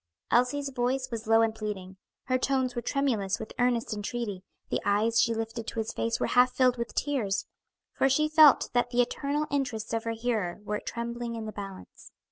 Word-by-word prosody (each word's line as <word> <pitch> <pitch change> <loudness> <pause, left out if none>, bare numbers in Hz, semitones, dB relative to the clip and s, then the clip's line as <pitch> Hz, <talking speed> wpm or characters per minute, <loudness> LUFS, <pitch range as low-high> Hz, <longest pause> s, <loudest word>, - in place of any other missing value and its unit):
Elsie's 275 +4 +2
voice 255 +1 -1
was 225 -1 -5
low 225 0 +5
and 225 -1 +1
pleading, 205 -4 -5 0.3
her 255 -1 0
tones 260 -1 0
were 240 - -3
tremulous 235 -7 0
with 220 - -7
earnest 245 -2 +1
entreaty, 205 -2 -4 0.3
the - - 0
eyes 215 +3 +3
she 230 - +2
lifted 225 0 -4
to - - -6
his 220 0 -2
face 230 0 -1
were - - +1
half 250 0 +4
filled 255 -1 +3
with 235 - -4
tears; 245 -9 0 0.5
for 270 - +2
she 305 +3 +3
felt 310 -2 +6
that 245 0 +2
the 245 0 +3
eternal 285 +4 -2
interests 240 -6 -2
of 225 0 -1
her 230 - -1
hearer 220 -7 -1
were 210 0 -2
trembling 235 0 -4
in 225 -1 -5
the 215 - -5
balance. 195 -2 -10
235 Hz, 195 wpm, -28 LUFS, 220-255 Hz, 0.5 s, felt